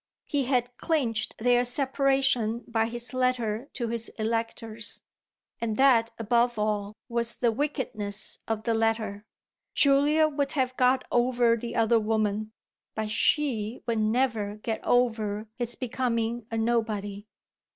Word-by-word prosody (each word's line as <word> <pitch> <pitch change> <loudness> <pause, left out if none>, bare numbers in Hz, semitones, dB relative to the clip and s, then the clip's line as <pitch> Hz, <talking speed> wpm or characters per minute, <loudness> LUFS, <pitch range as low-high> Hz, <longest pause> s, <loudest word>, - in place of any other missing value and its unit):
He 280 -3 -1
had 245 -1 0
clinched 255 -9 -1
their 245 +1 +3
separation 265 -3 +2
by 225 -1 0
his 240 +2 -3
letter 255 -1 -1
to 240 -3 -3
his 230 0 -2
electors 225 -1 -3 0.6
and 225 -2 -2
that 245 -4 +5
above 235 +1 +1
all 210 -1 -1
was 235 -1 0
the 240 -2 +1
wickedness 215 -6 -1
of 220 -1 -2
the 230 - 0
letter. 220 -2 -1 0.5
Julia 290 +3 +4
would 285 -2 -2
have 255 -3 0
got 255 +1 +3
over 240 -1 +3
the 235 +1 -6
other 225 0 +3
woman, 215 -1 -1 0.4
but 215 -1 -3
she 235 -3 +1
would 230 -2 0
never 215 -2 0
get 220 +1 -4
over 220 -3 +1
his 240 0 -2
becoming 235 -2 -2
a 225 - -3
nobody. 215 -3 -1
230 Hz, 130 wpm, -27 LUFS, 220-250 Hz, 0.6 s, that